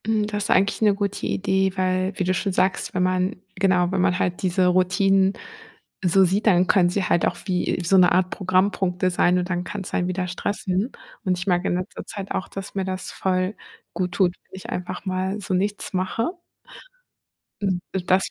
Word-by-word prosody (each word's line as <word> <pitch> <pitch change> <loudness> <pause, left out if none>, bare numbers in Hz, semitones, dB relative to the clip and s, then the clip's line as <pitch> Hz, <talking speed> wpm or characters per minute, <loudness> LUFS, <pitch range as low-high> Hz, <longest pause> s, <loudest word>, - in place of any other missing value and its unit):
Hm, 215 -1 +1
das 205 -1 -3
eigentlich 195 +3 +2
'ne 210 -2 +4
gute 200 -1 -2
Idee, 190 -1 +1
weil, 185 +1 0
wie 185 - 0
du 185 +1 +1
schon 195 +2 -1
sagst, 185 +1 0
wenn 180 - +2
man 185 +2 +1 0.2
genau, 185 -2 +2
wenn 190 -1 +1
man 180 -1 +2
halt 180 -1 -1
diese 185 0 +2
Routinen 190 +2 +3 0.7
so 190 +2 +4
sieht, 200 +5 0
dann 180 -3 +5
können 180 -3 +4
sie 190 +2 -1
halt 170 - +2
auch 175 - -3
wie 180 -2 0
so 190 +3 +4
'ne 180 -1 +6
Art 185 +1 +2
Programmpunkte 185 -1 +1
sein 180 0 +3
und 180 +1 -3
dann 175 -1 -1
kann's 195 0 -6
einen 180 - +1
wieder 185 0 -2
stressen. 190 +4 -2 0.3
Und 185 -1 +1
ich 180 - -4
merke 175 0 +2
in - - +1
letzter 180 +2 -5
Zeit 195 -1 -7
auch, 185 - -2
dass 195 -1 -7
mir 195 - 0
das 185 -1 -4
voll 185 +1 -1 0.4
gut 180 -1 -2
tut, 180 -1 +2 0.2
wenn - - -10
ich 190 - -9
einfach 180 +2 -5
mal 190 +2 -2
so 190 - -3
nichts 200 +3 -1
mache. 185 - -1 1.3
Hm, 190 -3 0
und 185 -2 -3
das 190 +1 +4
185 Hz, 200 wpm, -23 LUFS, 180-195 Hz, 1.3 s, ne